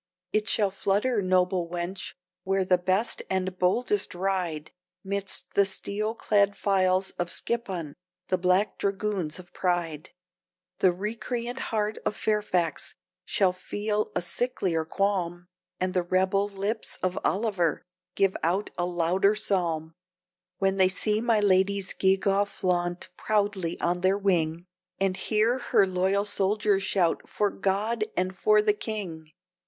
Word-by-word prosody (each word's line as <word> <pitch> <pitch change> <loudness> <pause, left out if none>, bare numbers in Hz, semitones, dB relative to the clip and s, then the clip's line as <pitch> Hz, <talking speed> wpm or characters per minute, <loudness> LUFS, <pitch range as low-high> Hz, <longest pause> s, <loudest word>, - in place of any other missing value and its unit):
"It 215 0 +1
shall 205 -3 +1
flutter, 205 +4 +1
noble 185 -2 +1
wench, 175 +2 -4 0.3
where 195 0 +1
the 180 -1 +3
best 190 +5 +1
and 185 -1 -2
boldest 240 - +1
ride, 175 -5 -2 0.3
Midst 200 0 -3
the 200 - +5
steel 200 +3 -2
clad 205 -3 +2
files 190 -1 +2
of 175 0 -1
Skippon, 185 -12 -3 0.4
the 185 - +2
black 185 +3 +2
dragoons 195 -5 -1
of 180 -1 -13
Pride; 170 -4 -1 0.7
The 185 - +5
recreant 235 +6 -4
heart 215 -1 -1
of - - -1
Fairfax 205 -6 0 0.3
shall 190 -3 +2
feel 210 +3 -2
a 180 - +1
sicklier 175 -4 -1
qualm, 175 -3 -1 0.3
And 185 0 -1
the 180 - +2
rebel 190 +3 +1
lips 205 +3 -3
of 185 0 0
Oliver 190 -6 0 0.3
give 195 -1 +2
out 180 +5 0
a 175 - +1
louder 180 +4 +2
psalm, 165 -6 0 0.6
When 195 0 +1
they 190 -1 +5
see 210 +3 0
my 230 -2 +3
lady's 195 -1 +2
gewgaw 195 +1 +2
flaunt 175 -3 -1
proudly 205 -5 0
on 175 +1 0
their 190 +2 +3
wing, 175 -4 0 0.3
And 195 -1 +1
hear 220 +6 +1
her 200 - +3
loyal 190 +2 +1
soldier's 205 0 +2
shout, 185 -3 0
'For 205 -1 0
God 210 +3 0
and 185 +1 0
for 420 - +4
the 420 -1 +4
King.'" 190 - -5
190 Hz, 135 wpm, -27 LUFS, 180-210 Hz, 0.7 s, the